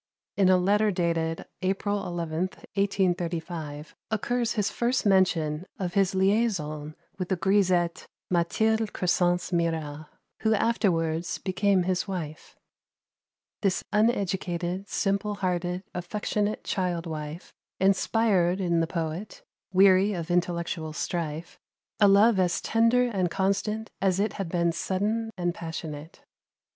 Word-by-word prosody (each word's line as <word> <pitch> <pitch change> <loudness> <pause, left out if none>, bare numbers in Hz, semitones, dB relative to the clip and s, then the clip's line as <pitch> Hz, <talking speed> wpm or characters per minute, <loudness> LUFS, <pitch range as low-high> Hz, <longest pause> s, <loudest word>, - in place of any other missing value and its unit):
In 195 -2 +4
a 185 - +6
letter 205 +4 +3
dated, 165 -3 -1 0.2
April 195 +2 0
11th, 170 +1 -3 0.2
1835, 175 -6 -1 0.2
occurs 235 +2 0
his 210 -3 0
first 240 +1 0
mention 180 -4 +2
of 180 -2 -3
his 195 -1 +2
liaison 190 -7 0 0.2
with 185 - -3
the 190 - +2
grisette 185 -2 +1 0.2
Mathilde 220 +5 +1
Crescence 175 0 +1
Mirat, 160 -3 -1 0.3
who 220 0 +2
afterwards 175 -8 0
became 195 0 +1
his 185 +2 -1
wife. 165 -5 -6 1.1
This 195 -3 +1
uneducated, 190 -4 0
simple 200 +1 0
hearted, 180 -1 -2
affectionate 210 +3 -2
child 180 -3 -1
wife 155 0 -6 0.3
inspired 195 -1 +2
in 170 -3 +1
the 165 - +1
poet, 165 +4 -4 0.3
weary 190 +1 +5
of 175 -1 -4
intellectual 170 -2 -1
strife, 165 0 -4 0.4
a 205 - +6
love 200 +1 +5
as 180 -2 +2
tender 230 +2 +3
and 195 -8 0
constant 200 +4 -1
as 190 -1 +2
it 210 +2 0
had 195 -5 -4
been 170 -1 +1
sudden 210 +6 -1
and 175 -1 0
passionate. 160 -2 -7
185 Hz, 120 wpm, -27 LUFS, 170-200 Hz, 1.1 s, a